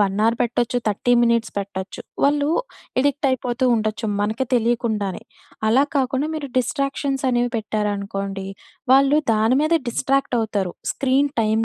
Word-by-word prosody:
1 195 Hz, -1 st, +1 dB
are 230 Hz, -, +3 dB
పెట్టచ్చు. 240 Hz, 0 st, 0 dB
30 215 Hz, +4 st, +1 dB
minutes 235 Hz, -1 st, +1 dB
పెట్టచ్చు. 195 Hz, -1 st, -5 dB, 0.2 s
వాళ్ళూ 285 Hz, +1 st, +3 dB, 0.5 s
ఎడిక్ట్ 285 Hz, +1 st, +1 dB
అయిపోతూ 255 Hz, 0 st, -1 dB
ఉండొచ్చు 220 Hz, 0 st, -1 dB
మనకి 220 Hz, +5 st, -1 dB
తెలియకుండానే. 225 Hz, -4 st, 0 dB, 0.5 s
అలా 260 Hz, +5 st, +4 dB
కాకుండా, 265 Hz, +2 st, 0 dB
మీరు 295 Hz, -3 st, -4 dB
డిస్ట్రాక్షన్స్ 275 Hz, +2 st, -1 dB
అనేవి 245 Hz, 0 st, +1 dB
పెట్టారనుకోండి. 200 Hz, -2 st, -3 dB, 0.5 s
వాళ్ళు 275 Hz, +2 st, +5 dB, 0.2 s
దాని 220 Hz, +4 st, +3 dB
మీద 330 Hz, +2 st, +3 dB
డిస్ట్రాక్ట్ 270 Hz, 0 st, 0 dB
అవుతారు 205 Hz, -5 st, -2 dB, 0.2 s
స్క్రీన్ 275 Hz, +1 st, +1 dB
టైమ్ 220 Hz, +1 st, +1 dB
240 Hz, 130 wpm, -22 LUFS, 215-270 Hz, 0.5 s, వాళ్ళు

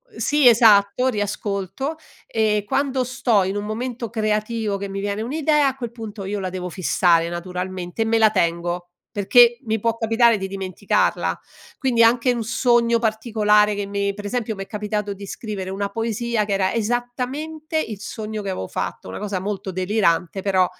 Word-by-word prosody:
Sì 295 Hz, -7 st, +3 dB
esatto, 225 Hz, +1 st, +5 dB
riascolto 205 Hz, -, -3 dB, 0.3 s
e 215 Hz, -2 st, +1 dB
quando 265 Hz, +3 st, 0 dB
sto 235 Hz, -4 st, +1 dB
in 190 Hz, +2 st, -2 dB
un 205 Hz, -, -3 dB
momento 235 Hz, +2 st, -4 dB
creativo 215 Hz, -1 st, -1 dB
che 200 Hz, 0 st, -5 dB
mi 195 Hz, 0 st, -5 dB
viene 205 Hz, +1 st, -2 dB
un'idea, 295 Hz, +4 st, +2 dB
a 265 Hz, -, -1 dB
quel 240 Hz, -4 st, -6 dB
punto 220 Hz, -3 st, -8 dB
io 200 Hz, +2 st, -3 dB
la 190 Hz, -1 st, -3 dB
devo 180 Hz, 0 st, -5 dB
fissare, 170 Hz, -1 st, +2 dB
naturalmente, 180 Hz, +3 st, -4 dB
e -, -, -4 dB
me 225 Hz, 0 st, +2 dB
la 220 Hz, -1 st, +6 dB
tengo, 175 Hz, -1 st, -1 dB, 0.2 s
perché 235 Hz, +4 st, +5 dB
mi 220 Hz, -2 st, -1 dB
può 230 Hz, 0 st, 0 dB
capitare 230 Hz, 0 st, +3 dB
di 195 Hz, -1 st, -4 dB
dimenticarla. 195 Hz, -, -1 dB, 0.4 s
Quindi, 245 Hz, -3 st, +3 dB
anche 240 Hz, +2 st, +4 dB
un 235 Hz, -2 st, -2 dB
sogno 235 Hz, 0 st, +2 dB
particolare 215 Hz, -2 st, +2 dB
che 200 Hz, 0 st, -3 dB
mi 200 Hz, 0 st, -1 dB
pre 205 Hz, 0 st, -7 dB
esempio 225 Hz, -1 st, -2 dB
mi 195 Hz, -, -5 dB
è -, -, -15 dB
capitato 210 Hz, -1 st, -3 dB
di 200 Hz, +1 st, -9 dB
scrivere 195 Hz, -3 st, -5 dB
una 200 Hz, +1 st, -2 dB
poesia 225 Hz, +1 st, -1 dB
che 205 Hz, -, -2 dB
era 190 Hz, -1 st, +1 dB
esattamente 250 Hz, +8 st, -3 dB
il 220 Hz, -10 st, -3 dB
sogno 215 Hz, 0 st, -5 dB
che 200 Hz, -, -4 dB
avevo 95 Hz, -, -4 dB
fatto, -, -, -4 dB
una -, -, -6 dB
cosa 200 Hz, -3 st, -3 dB
molto 195 Hz, -1 st, -4 dB
delirante, 185 Hz, -1 st, +1 dB
però, 190 Hz, -2 st, +3 dB
210 Hz, 175 wpm, -22 LUFS, 195-235 Hz, 0.4 s, la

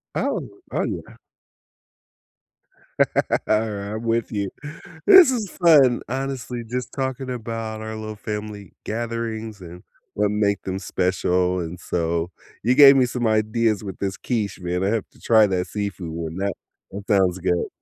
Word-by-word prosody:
Oh, -, -, -1 dB, 0.2 s
oh, -, -, 0 dB
yeah. -, -, -5 dB, 2.3 s
Alright. 105 Hz, -1 st, 0 dB
I'm 110 Hz, -, -5 dB
with 115 Hz, 0 st, 0 dB
you. 100 Hz, -2 st, -2 dB, 0.6 s
This 370 Hz, -8 st, +9 dB
is 220 Hz, -7 st, -2 dB
fun, 140 Hz, -7 st, +6 dB
honestly, 130 Hz, -2 st, -4 dB
just 125 Hz, 0 st, -3 dB
talking 130 Hz, -1 st, -3 dB
about 115 Hz, -2 st, -4 dB
our 110 Hz, 0 st, -5 dB
little 110 Hz, 0 st, -6 dB
family 105 Hz, -1 st, -6 dB
gatherings 115 Hz, -2 st, -4 dB
and 90 Hz, +1 st, -11 dB, 0.3 s
what 105 Hz, 0 st, +1 dB
make 100 Hz, -1 st, 0 dB
them 95 Hz, 0 st, -3 dB
special, 90 Hz, 0 st, 0 dB
and 85 Hz, +1 st, -5 dB
so, 85 Hz, 0 st, -2 dB, 0.3 s
you 125 Hz, +3 st, +3 dB
gave 140 Hz, -1 st, +9 dB
me 130 Hz, -2 st, +4 dB
some 120 Hz, -1 st, -1 dB
ideas 110 Hz, 0 st, +1 dB
with 95 Hz, -3 st, -7 dB
this 95 Hz, -1 st, -2 dB
quiche, 105 Hz, -6 st, -2 dB
man. 90 Hz, +1 st, -2 dB
I -, -, +1 dB
have 110 Hz, -2 st, 0 dB
to -, -, -22 dB
try 110 Hz, -2 st, +5 dB
that 90 Hz, -1 st, -1 dB
seafood 100 Hz, -5 st, -4 dB
one. 80 Hz, +1 st, -5 dB
That 100 Hz, 0 st, -1 dB, 0.4 s
that 100 Hz, +1 st, -7 dB
sounds 95 Hz, -3 st, +3 dB
good. 90 Hz, -1 st, 0 dB
105 Hz, 150 wpm, -23 LUFS, 95-115 Hz, 2.3 s, This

